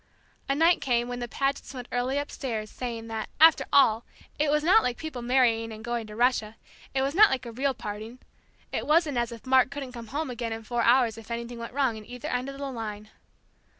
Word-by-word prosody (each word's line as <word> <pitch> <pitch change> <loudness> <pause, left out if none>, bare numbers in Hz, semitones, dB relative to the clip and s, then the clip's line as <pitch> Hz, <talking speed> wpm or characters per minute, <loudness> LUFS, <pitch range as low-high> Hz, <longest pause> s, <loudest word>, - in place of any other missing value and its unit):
A 275 - +2
night 330 +3 +4
came 240 -2 +1
when 245 0 -4
the 240 - -4
Pagets 275 +2 -2
went 250 -1 -7
early 250 +3 0
upstairs, 235 -7 -4
saying 235 -3 -5
that, 220 -1 -4
after 320 0 +7
all, 230 -5 +5 0.4
it 300 0 +2
was 300 +1 +2
not 380 +7 +6
like 245 -1 -2
people 315 -6 -6
marrying 235 -2 +2
and 220 0 -9
going 235 -2 -3
to 210 - -10
Russia; 230 -2 +1 0.4
it 265 - +2
was 275 +1 -1
not 415 +4 +7
like 260 - -2
a 235 - -6
real 265 +3 -1
parting; 215 +4 -7 0.5
it - - -3
wasn't 305 -4 +3
as 240 0 -1
if 230 +1 -10
Mark 260 0 +4
couldn't 280 -2 -6
come 235 -2 -9
home 285 +3 -3
again 235 -2 -3
in 225 0 -7
four 240 +2 -1
hours 235 -2 +3
if 225 - -14
anything 235 0 -5
went 230 0 -7
wrong 260 -5 0
at 215 - -14
either 245 -1 -6
end 250 +2 -2
of 275 - -8
the 280 - -5
line. 215 -3 -6
245 Hz, 225 wpm, -27 LUFS, 230-275 Hz, 0.5 s, after